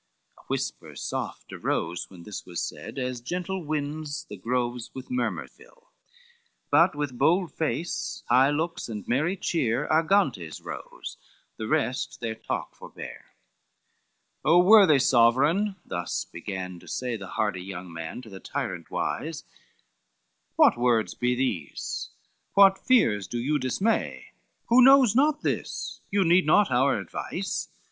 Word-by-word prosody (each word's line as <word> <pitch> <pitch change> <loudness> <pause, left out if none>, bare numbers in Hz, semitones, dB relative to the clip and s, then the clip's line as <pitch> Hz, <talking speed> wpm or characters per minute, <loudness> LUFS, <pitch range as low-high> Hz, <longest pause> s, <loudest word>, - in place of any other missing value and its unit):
A - - -19
whisper - - -4
soft - - -5
arose 85 - -2
when 90 -3 -13
this 105 +2 -7
was 85 -2 -6
said, - - -6
As 125 -2 -3
gentle 180 +6 -3
winds 150 0 -3
the 105 - -8
groves 120 +3 -2
with 130 - -8
murmur 255 - -1
fill, - - -22 0.8
But 165 +3 +5
with 145 -4 -4
bold 170 +5 +3
face, 160 +2 -3
high 130 +3 +5
looks 155 -1 -2
and 105 -3 -6
merry 155 +10 +1
cheer, 140 -7 0
Argantes 155 - +2
rose, - - -8 0.4
the 110 - -4
rest 125 +4 -1
their 115 -2 -3
talk 110 - -4
forbear. - - -10
XXXVII - - -43
"O 170 +3 +6
worthy 195 -6 +7
sovereign," 135 - +3
thus 85 -1 -3
began 90 -3 -6
to - - -17
say 125 -2 -3
The 100 -3 -7
hardy 105 -4 0
young 90 -2 -8
man 80 +9 -6
to 110 - -12
the 95 - -9
tyrant - - -4
wise, 160 -1 -3 1.1
"What - - +5
words 120 -3 +2
be 125 0 0
these? 85 - -3 0.5
what 195 -1 +7
fears 110 - +3
do 120 - -4
you 145 +5 0
dismay? 190 - -1 0.4
Who 240 +2 +7
knows 265 -3 +7
not 300 +3 +3
this, - - -3
you 200 -1 +2
need 175 -1 +4
not 205 +3 +4
our 130 +2 +3
advice! 95 - -4
135 Hz, 140 wpm, -26 LUFS, 110-175 Hz, 1.1 s, worthy